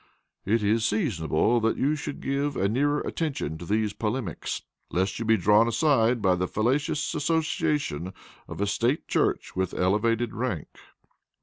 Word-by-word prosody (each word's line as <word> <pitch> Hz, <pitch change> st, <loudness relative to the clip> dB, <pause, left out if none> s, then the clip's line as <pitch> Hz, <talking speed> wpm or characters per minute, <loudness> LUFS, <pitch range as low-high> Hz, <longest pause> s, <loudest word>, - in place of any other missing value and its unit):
It 110 Hz, +2 st, +1 dB
is 110 Hz, +2 st, +2 dB
seasonable 110 Hz, -, +1 dB
that 115 Hz, 0 st, +1 dB
you 145 Hz, +3 st, +1 dB
should 150 Hz, -1 st, -6 dB
give 140 Hz, +1 st, -1 dB
a 100 Hz, -, +2 dB
nearer 145 Hz, +7 st, +1 dB
attention 135 Hz, -, -3 dB
to 85 Hz, -, -7 dB
these 105 Hz, 0 st, 0 dB
polemics, 110 Hz, -, -3 dB, 0.3 s
lest 95 Hz, +3 st, -1 dB
you 115 Hz, -, -3 dB
be 110 Hz, 0 st, +4 dB
drawn 105 Hz, +4 st, +4 dB
aside 120 Hz, -3 st, +2 dB
by 95 Hz, -1 st, +4 dB
the 90 Hz, +1 st, -1 dB
fallacious 145 Hz, -, 0 dB
association 150 Hz, -, -1 dB, 0.4 s
of -, -, -6 dB
a -, -, +2 dB
State 120 Hz, +8 st, 0 dB
Church -, -, 0 dB
with 95 Hz, -1 st, -1 dB
elevated 110 Hz, +5 st, +1 dB
rank." 110 Hz, -, -3 dB
115 Hz, 150 wpm, -26 LUFS, 100-140 Hz, 0.4 s, be